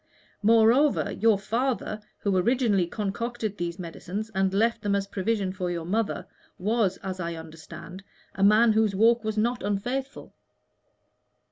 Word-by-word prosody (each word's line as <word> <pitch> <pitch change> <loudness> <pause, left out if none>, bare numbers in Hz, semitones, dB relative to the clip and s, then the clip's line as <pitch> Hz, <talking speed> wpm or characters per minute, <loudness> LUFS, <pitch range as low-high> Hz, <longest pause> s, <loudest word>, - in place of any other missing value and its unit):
Moreover, 230 +6 +4
your 220 -2 +3
father, 225 +1 -2 0.2
who 200 -2 0
originally 205 -2 +2
concocted 215 +2 -3
these 170 0 -3
medicines 185 +5 -6
and 190 -1 +1
left 225 +4 +1
them 200 -1 0
as 200 -1 0
a - - -28
provision 195 -1 -1
for 185 -2 -3
your 170 -2 -3
mother, 215 +4 -1 0.3
was, 205 -1 0
as 190 -1 -4
I 170 -1 -3
understand, 165 +3 -10 0.3
a 195 - -2
man 215 +3 +6
whose 215 -2 +2
walk 230 +3 +4
was 220 0 -3
not 240 +3 0
unfaithful." 245 +8 -3
205 Hz, 145 wpm, -26 LUFS, 185-230 Hz, 0.3 s, man